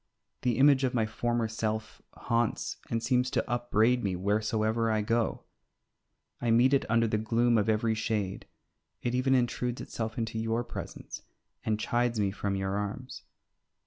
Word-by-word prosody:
The 120 -3 +1
image 140 0 +5
of 125 -1 0
my 115 -2 +2
former 120 +1 -1
self 110 0 -3
haunts 115 -1 -1
and 115 0 -1
seems 125 -1 +2
to - - -1
upbraid 120 0 +2
me 95 -2 0
wheresoever 110 +4 0
I 110 -1 +1
go. 115 +1 0 1.0
I 120 - 0
meet 120 +4 +5
it 135 - +2
under 115 0 +3
the 110 -1 0
gloom 115 +2 +2
of 110 0 +2
every 110 +1 +2
shade; 110 -3 -2 0.6
it 120 - -1
even 130 +1 +3
intrudes 125 0 0
itself 110 -1 -5
into 115 -1 -2
your 115 +1 0
presence 120 - -7 0.4
and 110 -1 0
chides 120 0 0
me 100 -2 +1
from 100 0 -2
your 95 +1 -1
arms. 105 +6 -5
115 Hz, 160 wpm, -29 LUFS, 110-120 Hz, 1.0 s, image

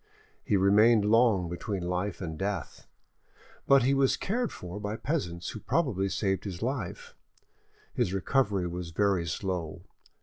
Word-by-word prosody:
He 100 - +2
remained 105 +3 +5
long 110 -4 +4
between 90 +2 -4
life 90 +2 -2
and 80 -4 -4
death, 95 0 -4 0.8
but 140 -2 +6
he 135 +3 +3
was 135 -1 +3
cared 240 +4 -1
for 90 +3 -7
by 105 +1 -3
peasants 90 - -3
who - - -6
probably 105 - 0
saved 95 0 -1
his 95 -1 -5
life; 125 -8 -4 0.8
his - - 0
recovery 100 -1 +1
was 85 0 -5
very 95 -1 +1
slow. 85 -1 -3
100 Hz, 140 wpm, -29 LUFS, 90-115 Hz, 0.8 s, but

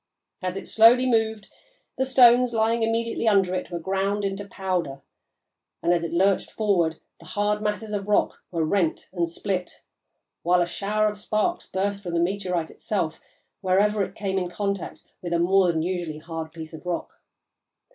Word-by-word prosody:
As 185 0 -3
it - - -6
slowly 235 +3 +6
moved, 220 -4 +1 0.5
the 265 - 0
stones 250 -2 +6
lying 225 +1 +2
immediately 230 +1 0
under 195 -4 +3
it 185 - -3
were 175 - -4
ground 195 +3 -1
into 195 +1 -3
powder, 180 -9 -3 0.8
and, 175 - +3
as 170 -1 0
it 165 - -3
lurched 190 +3 +2
forward, 175 -7 +1 0.2
the - - -15
hard 210 0 0
masses 210 0 -2
of 200 -1 -3
rock 210 - +1
were 165 -3 -1
rent 170 -1 0
and 170 -2 0
split, 185 +1 -4 0.6
while 180 +1 +3
a - - -1
shower 210 +4 0
of 210 -1 -3
sparks 215 +12 -1
burst 200 +1 -2
from 175 -3 -4
the - - +2
meteorite 180 -2 -1
itself 200 -8 -3 0.4
wherever 200 +2 +2
it 190 +1 -6
came 195 -2 -1
in 180 -1 -3
contact 200 +1 -3 0.2
with 175 -1 -3
a - - +3
more 190 +2 +4
than 160 -1 -1
usually 175 -3 -3
hard 160 0 -6
piece 160 -1 -9
of 160 - -9
rock. 180 -1 -4
195 Hz, 175 wpm, -25 LUFS, 175-210 Hz, 0.8 s, slowly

